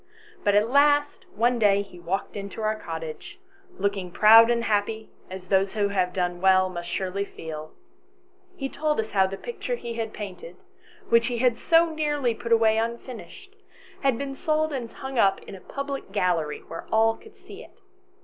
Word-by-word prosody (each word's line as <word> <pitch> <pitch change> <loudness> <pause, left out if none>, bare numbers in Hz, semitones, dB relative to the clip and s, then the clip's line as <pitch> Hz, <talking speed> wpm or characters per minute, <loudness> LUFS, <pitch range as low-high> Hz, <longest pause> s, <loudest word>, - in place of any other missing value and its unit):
But 205 -1 +3
at 210 +2 +4
last 290 +1 +3
one 240 +2 +2
day 200 -2 +4
he 185 -3 -15
walked 175 +5 -3
into 200 +2 -6
our 215 0 +1
cottage, 160 -5 -7 0.4
looking 200 -3 -2
proud 225 +5 +7
and 235 -1 +1
happy, 220 +1 -1 0.2
as 185 0 -8
those 190 +1 +1
who 205 -2 0
have 185 -2 0
done 175 -1 -2
well 185 0 +4
must 175 -1 -6
surely 190 +2 -2
feel. 155 -5 -8 0.8
He 270 -6 -3
told 300 0 -1
us 220 0 -2
how 190 -2 +3
the 195 +1 -6
picture 480 - -4
he 235 - -6
had 225 -1 -4
painted, 180 -4 -8 0.5
which 230 0 +4
he 245 -1 -2
had 245 0 +2
so 330 +5 +3
nearly 295 -6 0
put 235 +1 -7
away 225 -1 +4
unfinished, 235 - -6 0.5
had 270 -4 +2
been 275 +1 -4
sold 310 +2 0
and 240 -4 -4
hung 265 -2 -5
up 195 -3 +4
in - - -11
a 190 - -10
public 275 -3 -6
gallery, 175 -6 -1
where 165 - -8
all 225 0 +3
could 430 -1 -17
see 400 +4 -12
it. - - -19
220 Hz, 180 wpm, -25 LUFS, 190-265 Hz, 0.8 s, proud